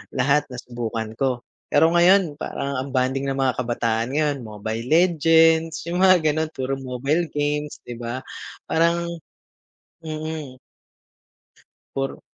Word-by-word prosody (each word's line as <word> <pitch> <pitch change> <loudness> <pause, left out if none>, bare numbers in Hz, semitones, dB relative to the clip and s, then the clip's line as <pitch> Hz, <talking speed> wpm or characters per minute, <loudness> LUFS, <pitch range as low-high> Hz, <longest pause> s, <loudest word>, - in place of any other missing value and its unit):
lahat 140 +3 +2
nasubukan 120 -3 -5
ko. 130 -3 0 0.2
Pero 160 - +4
ngayon 175 -3 +4
parang 140 -3 -3
ang 135 +2 -4
bonding 130 +2 0
ng 135 - -1
mga 130 -2 +1
kabataan 115 -1 0
ngayon, 150 -2 +1
Mobile 110 +1 -5
Legends 165 0 +4
yung 175 +2 -3
mga 185 -3 +5
gano'n, 155 +1 -1
puro 135 +1 -2
mobile 135 +6 -1
games 150 0 -2
'di 120 -1 -8
ba 120 +2 -5 0.5
parang 170 +1 +2 1.0
mm. 155 -4 -6 1.3
Puro 135 0 -3
140 Hz, 120 wpm, -23 LUFS, 125-160 Hz, 1.3 s, mga